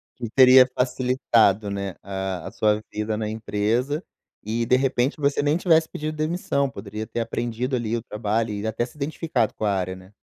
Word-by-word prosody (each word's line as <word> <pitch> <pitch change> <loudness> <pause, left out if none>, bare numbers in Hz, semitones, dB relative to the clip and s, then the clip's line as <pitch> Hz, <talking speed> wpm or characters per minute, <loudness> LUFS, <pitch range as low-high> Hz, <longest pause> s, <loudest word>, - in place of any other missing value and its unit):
Que 120 -3 -6
teria 130 0 +7
facilitado, 125 -5 +2
né, 100 -2 -4
a 95 -2 -4
a - - -7
sua 105 -1 +1
vida 105 0 -2
na 110 -1 -2
empresa 115 - -1 0.4
e 115 +2 -1
de 125 - +4
repente 130 0 +1
você 145 0 +1
nem 150 +3 +2
tivesse 160 -3 +3
pedido 155 +1 -4
demissão, 155 -3 0
poderia 110 -3 -7
ter 120 - -5
aprendido 120 +3 -2
ali 115 -1 -1
o - - -4
trabalho 110 0 -2
e 105 +1 -4
até 110 +2 -1
se 125 - -16
identificado 150 -4 -1
com 110 - -4
a - - +2
área, 95 -1 -2
né. 95 +1 -15
115 Hz, 185 wpm, -24 LUFS, 105-135 Hz, 0.4 s, teria